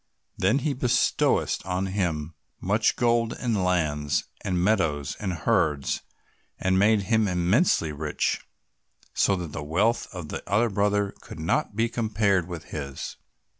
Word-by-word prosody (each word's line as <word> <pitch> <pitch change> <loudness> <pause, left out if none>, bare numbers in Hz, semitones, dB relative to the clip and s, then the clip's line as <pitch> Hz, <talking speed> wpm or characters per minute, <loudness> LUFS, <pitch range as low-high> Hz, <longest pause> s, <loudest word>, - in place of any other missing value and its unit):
Then 100 +8 +2
he 150 - +1
bestowed 125 -2 +2
on 90 +1 -1
him 85 -5 -2 0.3
much 105 +4 +2
gold, 120 -1 +2
and 115 -6 0
lands, 75 -5 +1 0.2
and 90 -1 0
meadows, 80 -8 +1
and 95 -3 -2
herds, 80 -4 0 0.6
and 95 0 +1
made 105 0 +4
him 110 +1 +2
immensely 90 - +2
rich, 75 0 -1 0.7
so 100 - +3
that 85 -4 -5
the 70 - -5
wealth 95 +11 +1
of 90 -5 -7
the - - -4
other 110 +4 +2
brother 100 0 +1
could - - -10
not 80 +5 0
be 115 +2 +2
compared 105 -6 +1
with 85 -3 -6
his. 70 -3 -5
95 Hz, 140 wpm, -26 LUFS, 80-110 Hz, 0.7 s, made